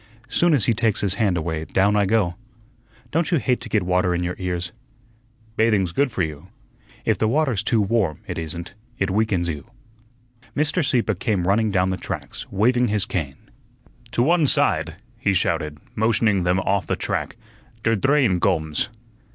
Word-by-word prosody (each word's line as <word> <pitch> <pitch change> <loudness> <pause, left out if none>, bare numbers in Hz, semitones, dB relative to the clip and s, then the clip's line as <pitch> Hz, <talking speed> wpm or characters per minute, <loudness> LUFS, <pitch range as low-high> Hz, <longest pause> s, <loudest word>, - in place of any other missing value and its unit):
Soon 170 +4 +3
as 125 - +1
he 115 - +3
takes 110 -1 +1
his 100 -2 0
hand 100 -5 +2
away, 80 -1 -2
down 100 +5 +2
I 100 -2 +3
go. 100 -4 +2 0.8
Don't 160 0 +1
you 170 - +3
hate 125 -3 0
to - - -7
get 105 -4 +1
water 90 0 +1
in 90 - -1
your 90 +1 -2
ears?" 90 -1 -3 0.9
"Bathing's 105 -6 +2
good 140 +7 +1
for 95 - -1
you." 75 -2 -5 0.6
"If - - +1
the 110 - +2
water's 130 -4 +1
too 110 +1 +1
warm, 100 -6 0
it - - -4
isn't. 85 +2 -6 0.2
It 100 -1 0
weakens 100 -4 +1
you." 85 +7 -5 0.9
Mr. 155 +4 +1
Sieppe 125 -5 +1
came 95 -2 -1
running 110 +3 +3
down 95 -1 +1
the 95 - -2
tracks, - - -6
waving 120 +5 +3
his 105 -2 +1
cane. 70 -7 -3 0.8
"To 120 - +2
one 165 +1 +3
side," 80 -8 +2 0.2
he 100 -3 +1
shouted, 75 -3 0 0.2
motioning 110 -2 +2
them 90 +1 +2
off 95 0 0
the - - 0
track; - - -3 0.5
"der 115 0 +3
drain 130 -4 +2
gomes." 80 -3 0
100 Hz, 175 wpm, -22 LUFS, 90-115 Hz, 0.9 s, Soon